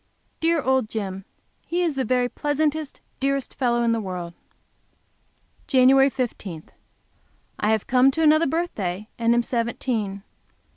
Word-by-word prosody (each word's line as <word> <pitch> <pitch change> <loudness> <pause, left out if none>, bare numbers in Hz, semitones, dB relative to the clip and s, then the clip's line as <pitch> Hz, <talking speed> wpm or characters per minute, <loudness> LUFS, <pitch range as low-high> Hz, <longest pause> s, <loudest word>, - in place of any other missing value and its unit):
Dear 330 -2 +1
old 260 -4 +1
Jim! 195 -4 -5 0.4
He 350 +1 0
is 335 -3 0
the 270 -1 -1
very 250 +1 +1
pleasantest, 295 +2 -2 0.2
dearest 275 0 -1
fellow 240 -2 +1
in 230 - +2
the 230 - +1
world! 180 -3 -5 1.3
Jan. 270 0 +5
15. 205 - -4 1.0
I 210 - +1
have 220 -2 +1
come 255 +1 +4
to 320 +4 0
another 310 +1 +5
birthday 215 - -3
and 230 0 +3
am 240 - +2
seventeen. 230 -4 -2
250 Hz, 135 wpm, -24 LUFS, 215-275 Hz, 1.3 s, Jan